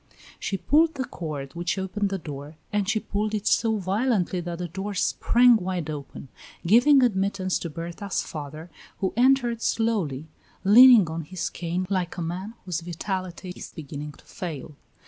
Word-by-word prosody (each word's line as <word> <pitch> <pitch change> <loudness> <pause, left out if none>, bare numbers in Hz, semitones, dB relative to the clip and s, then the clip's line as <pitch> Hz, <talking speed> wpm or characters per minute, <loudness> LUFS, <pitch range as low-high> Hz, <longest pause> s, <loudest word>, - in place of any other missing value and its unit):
She 195 - -2
pulled 315 - +3
the 260 -2 -2
cord 145 - -6
which 175 +3 -2
opened 195 +2 -1
the 195 - -2
door, 150 -2 -8 0.2
and 205 -1 0
she 220 - +2
pulled 215 +1 -2
it 210 -1 -3
so 225 -2 +2
violently 195 -2 0
that 170 0 -5
the 175 0 -4
door 195 +4 -5
sprang 240 +5 +4
wide 180 -5 -3
open, 140 -2 -8 0.4
giving 250 - +6
admittance 195 -4 0
to 170 - -5
Berta's 170 +5 -4
father, 155 +2 -8 0.3
who 190 - -1
entered 245 -2 +3
slowly, 185 - 0 0.4
leaning 225 0 +8
on 160 +1 -4
his 170 +2 -4
cane 175 +2 -3
like 185 -3 -2
a - - -3
man 185 +7 -5
whose 175 -3 -2
vitality 180 +1 -5
is - - -9
beginning 150 -1 -7
to - - -20
fail. 155 -4 -7
185 Hz, 165 wpm, -25 LUFS, 165-215 Hz, 0.4 s, leaning